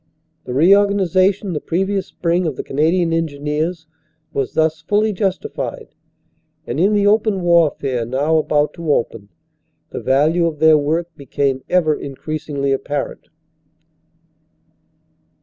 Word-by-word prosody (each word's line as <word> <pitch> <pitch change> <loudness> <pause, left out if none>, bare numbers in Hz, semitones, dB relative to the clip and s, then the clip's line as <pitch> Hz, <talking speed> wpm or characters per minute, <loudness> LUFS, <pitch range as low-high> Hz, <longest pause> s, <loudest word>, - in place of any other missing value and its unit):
The 125 - -5
re 170 +8 +6
organization 195 -1 +1
the 150 - -3
previous 195 +3 -1
spring 175 0 -1
of 150 - -3
the - - -5
Canadian 165 +4 +1
Engineers 160 +1 -2 0.5
was 135 -2 -2
thus 160 0 +1
fully 210 +5 +1
justified, 190 -1 -3 0.8
and 120 +5 -4
in 195 +5 +3
the 205 -1 +2
open 210 -1 +2
warfare 155 -8 +2
now 140 +7 0
about 150 -1 +1
to 165 -3 -3
open, 115 -6 -2 0.6
the - - -5
value 155 +6 +2
of 160 -2 -4
their 160 +1 +5
work 165 +3 -2
became 135 -1 -2
ever 170 -4 +3
increasingly 140 0 -4
apparent. 140 +1 -3
160 Hz, 125 wpm, -19 LUFS, 145-180 Hz, 0.8 s, re